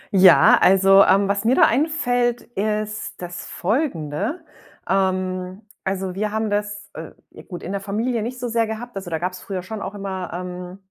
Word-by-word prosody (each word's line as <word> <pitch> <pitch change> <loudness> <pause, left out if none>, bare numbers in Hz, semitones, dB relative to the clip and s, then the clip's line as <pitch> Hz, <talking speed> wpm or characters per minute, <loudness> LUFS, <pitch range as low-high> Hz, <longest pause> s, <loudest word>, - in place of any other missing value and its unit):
Ja, 185 -2 +7
also, 195 +1 +6
ähm, 195 +1 +4
was 200 +1 0
mir 240 +3 +3
da - - +5
einfällt, 245 -4 +1
ist 215 +1 -3
das 175 -1 -7
Folgende. 215 - -2 0.4
Ähm, 185 +1 -1 0.2
also, 190 -1 -2
wir 210 +2 -2
haben 220 0 -1
das 205 0 -3
äh, - - -8 0.2
ja - - -12
gut, 175 -3 -9
in 180 - -5
der 200 0 -3
Familie 220 +4 -1
nicht 245 +3 -5
so 245 - -3
sehr 230 -1 +1
gehabt. 225 +2 -6
Also, 190 -2 -6
da 165 - -1
gab's 180 +2 -4
früher 185 -3 -5
schon 215 +2 -6
auch 200 - -5
immer, 190 -2 -5
ähm, 180 +1 -6
200 Hz, 180 wpm, -22 LUFS, 185-220 Hz, 0.4 s, Ja